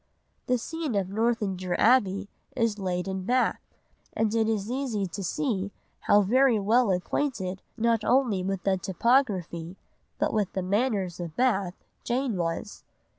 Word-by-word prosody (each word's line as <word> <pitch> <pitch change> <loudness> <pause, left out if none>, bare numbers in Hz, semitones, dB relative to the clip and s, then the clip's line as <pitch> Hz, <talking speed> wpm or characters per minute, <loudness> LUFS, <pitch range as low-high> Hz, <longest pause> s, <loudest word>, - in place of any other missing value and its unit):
The 250 - +3
scene 310 0 -4
of 195 -2 0
Northanger 200 -4 -1
Abbey 200 -5 +3 0.3
is 230 -3 0
laid 180 -1 -2
in 190 -1 -3
Bath, 250 +5 +1 0.5
and 220 -1 0
it 225 -1 +2
is 215 0 -1
easy 250 -7 -1
to 190 +2 -6
see 200 - -1 0.3
how 205 0 +4
very 250 +3 +4
well 220 +3 +3
acquainted 190 0 -1 0.2
not 230 -1 +2
only 245 -7 +2
with 190 0 -3
the 195 -1 +2
topography, 190 -4 0 0.4
but - - 0
with 210 -4 0
the 190 - -2
manners 200 -3 0
of 170 -3 -6
Bath, 200 -8 +1 0.3
Jane 245 -1 -1
was. 170 +4 -3
205 Hz, 145 wpm, -27 LUFS, 190-240 Hz, 0.5 s, how